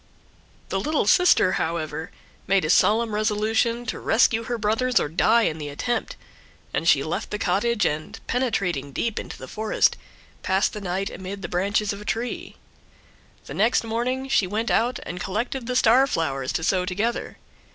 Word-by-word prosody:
The 195 - -1
little 300 +6 0
sister, 350 - +5
however, 160 0 -3 0.4
made 195 -3 +3
a 155 - +2
solemn 220 +3 +3
resolution 220 +3 0
to - - -4
rescue 225 0 +2
her 240 0 -2
brothers 230 +4 +1
or - - -1
die 220 +9 +3
in 160 -6 -1
the 145 -1 -5
attempt; 240 +12 -2 0.6
and - - -1
she - - +4
left - - -3
the 210 - -3
cottage, 210 +2 +1
and, 155 0 -3
penetrating 180 - -1
deep 230 - -1
into - - -8
the - - -9
forest, 215 0 +1 0.4
passed 190 +1 +1
the 210 - -6
night 190 +1 -2
amid 195 +1 -7
the - - -3
branches 200 +3 0
of 200 - -8
a - - -10
tree. 230 +3 -3 0.9
The - - -8
next 225 +5 +2
morning 245 +4 -2
she 210 -8 +2
went 220 +5 -1
out 240 +2 +2
and 180 - -6
collected 230 +6 -3
the 250 - -2
star 255 +2 +5
flowers 135 - -1
to 160 - -2
sew 180 +2 +2
together. 205 +6 -2
210 Hz, 170 wpm, -24 LUFS, 180-235 Hz, 0.9 s, sister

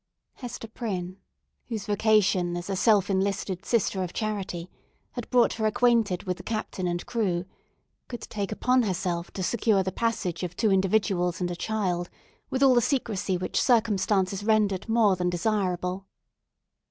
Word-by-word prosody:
Hester 240 -3 -7
Prynne—whose 205 +1 -7
vocation, 205 -4 +2
as 175 +3 -5
a - - 0
self 205 -1 +4
enlisted 195 -1 -1
Sister 205 -4 +1
of 180 -2 -4
Charity, 195 -6 -3 0.4
had 245 -3 -6
brought 245 -2 +4
her 220 -1 0
acquainted 230 -5 +2
with 180 -1 -2
the - - -9
captain 215 -4 -3
and 175 0 -2
crew—could 195 +3 -5
take 205 -2 -4
upon 250 +4 +2
herself 180 -4 -2
to 190 - -4
secure 210 -1 +2
the 190 - -2
passage 200 -6 -1
of 180 -1 -4
two 220 -3 +2
individuals 190 -3 +1
and 175 -1 -1
a - - -3
child 180 -3 -2 0.4
with 265 +1 0
all 265 -2 +7
the 240 - +4
secrecy 215 -8 0
which 185 - -1
circumstances 205 -4 +2
rendered 210 -2 +1
more 225 -4 +4
than 180 0 0
desirable. 185 0 -1
200 Hz, 150 wpm, -27 LUFS, 180-220 Hz, 0.4 s, all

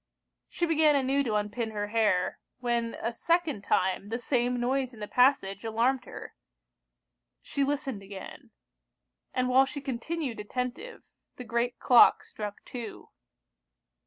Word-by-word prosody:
She 345 - -1
began 315 -2 +4
anew 275 0 +2
to 220 -3 0
unpin 210 +2 -1
her 205 -1 -4
hair, 210 -5 +1 0.2
when 235 -2 -1
a 230 - 0
second 325 - 0
time 190 +1 0
the 230 - -1
same 245 0 0
noise 255 0 -1
in - - -14
the 210 - -5
passage 240 -7 +2
alarmed 240 +3 +1
her. - - -9 1.1
She 280 - -1
listened 275 -6 -2
again; 195 -1 -10 0.8
and 255 0 0
while 260 +2 +5
she 285 - -5
continued 270 -1 -4
attentive, 250 - -5 0.3
the 250 - -7
great 235 +1 -1
clock 245 -2 +6
struck 210 -1 -7
two. 235 -4 -8
245 Hz, 135 wpm, -29 LUFS, 215-270 Hz, 1.1 s, clock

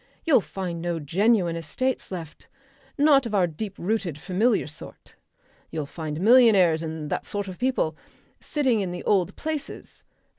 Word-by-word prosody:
You'll 305 -9 +5
find 180 -4 -5
no 170 -1 -2
genuine 180 +3 +2
estates 180 - -2
left, 165 -5 -8 0.5
not 280 -3 +5
of 215 - -3
our 190 -3 +4
deep 190 +5 -6
rooted 185 -5 -2
familiar 200 +8 +1
sort. 155 +1 -12 0.6
You'll 155 -2 -4
find 155 0 -6
millionaires 200 -7 +5
and 160 -2 -5
that - - -1
sort 205 -1 -4
of 185 -2 -8
people, 250 -11 0 0.4
sitting 260 -8 0
in 190 - -2
the 175 - -6
old 195 -2 +1
places. 310 -2 -6
185 Hz, 150 wpm, -25 LUFS, 165-230 Hz, 0.6 s, You'll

